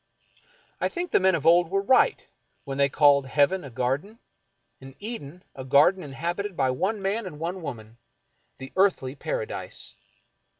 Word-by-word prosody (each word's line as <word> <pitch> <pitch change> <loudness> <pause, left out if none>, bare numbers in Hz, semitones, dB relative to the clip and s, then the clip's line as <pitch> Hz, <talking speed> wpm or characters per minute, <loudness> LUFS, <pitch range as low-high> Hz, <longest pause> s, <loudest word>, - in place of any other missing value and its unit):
I - - 0
think 355 0 -4
the - - +4
men 190 -1 +3
of 155 -2 -4
old 170 0 +5
were 195 +1 0
right 260 - +3 0.4
when 135 -1 -6
they 140 0 +4
called 140 -1 +4
heaven 145 +7 +2
a 140 - -8
garden, 135 - -2 0.6
and 135 0 -13
Eden 180 -7 -8
a 130 - -8
garden 145 +8 +4
inhabited 175 +7 -4
by 130 -2 +2
one 195 +10 -2
man 200 +2 -1
and 155 -5 -9
one 175 +3 -4
woman, 115 -6 -8 0.6
the 135 0 -10
Earthly 185 -9 +2
Paradise. 480 - -6
165 Hz, 160 wpm, -25 LUFS, 135-195 Hz, 0.6 s, old